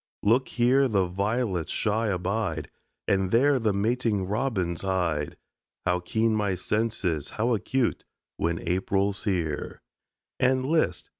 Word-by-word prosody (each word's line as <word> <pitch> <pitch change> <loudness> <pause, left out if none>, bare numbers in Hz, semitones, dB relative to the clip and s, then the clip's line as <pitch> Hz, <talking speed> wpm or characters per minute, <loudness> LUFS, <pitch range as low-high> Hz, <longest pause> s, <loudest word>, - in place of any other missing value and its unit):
Look, 120 +5 +3
here 130 +3 +3
the 100 -6 +2
violets 100 0 -1
shy 110 +1 0
abide 95 -4 -2 0.4
And 95 -1 +2
there 135 +6 +4
the 110 -3 +1
mating 105 0 0
robins 100 -5 -1
hide 85 -6 -1 0.5
How 90 0 +2
keen 110 +5 0
my 100 -3 0
senses, 95 -6 -1
how 120 +3 0
acute, 125 +3 0 0.3
When 85 0 -2
April's 95 +3 0
here! 85 -7 -2 0.6
And 130 0 +2
list! 160 +3 +1
100 Hz, 125 wpm, -27 LUFS, 90-115 Hz, 0.6 s, there